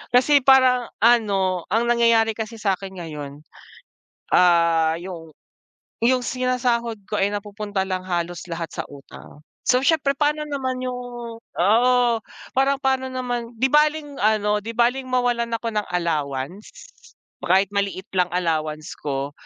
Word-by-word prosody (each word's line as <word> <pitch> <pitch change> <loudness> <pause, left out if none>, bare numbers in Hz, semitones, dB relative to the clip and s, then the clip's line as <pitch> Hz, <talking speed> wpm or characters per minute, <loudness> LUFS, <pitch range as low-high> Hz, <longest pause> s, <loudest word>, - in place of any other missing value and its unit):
Kasi 285 +3 +5
parang 255 -2 +5 0.2
ano, 200 -6 +3
ang 225 +5 +1
nangyayari 230 -1 +4
kasi 220 +1 -5
sakin 195 -2 -2
ngayon. 150 -4 -8 0.9
Ah, 170 -2 +4
yung 170 -2 -8 0.7
yung 250 +1 +3
sinasahod 245 -2 0
ko, 210 - -1
ay 195 - +3
napupunta 205 -1 -3
lang 185 -1 -3
halos 175 -1 -2
lahat 165 -1 -5
sa - - -4
utang. 145 +1 -14 0.2
So 255 +1 +3
syempre 280 -2 +2
paano 300 +2 0
naman 260 -3 -3
yung 250 -1 -3 0.4
oo. 225 +8 +2 0.6
Parang 270 +1 +2
paano 265 -1 0
naman. 245 -2 -3
'Di 265 - +4
baleng 300 -1 +2
ano, 210 0 +2
'di 225 - -5
baleng 245 +3 +1
mawalan 245 -2 0
ako 230 - -5
ng 210 -1 -1
allowance. 160 0 -3 0.7
Kahit 190 +3 +3
maliit 200 -2 -2
lang 180 -2 +2
allowance 155 -1 -2
ko, 140 -1 -3
215 Hz, 135 wpm, -22 LUFS, 175-250 Hz, 0.9 s, Kasi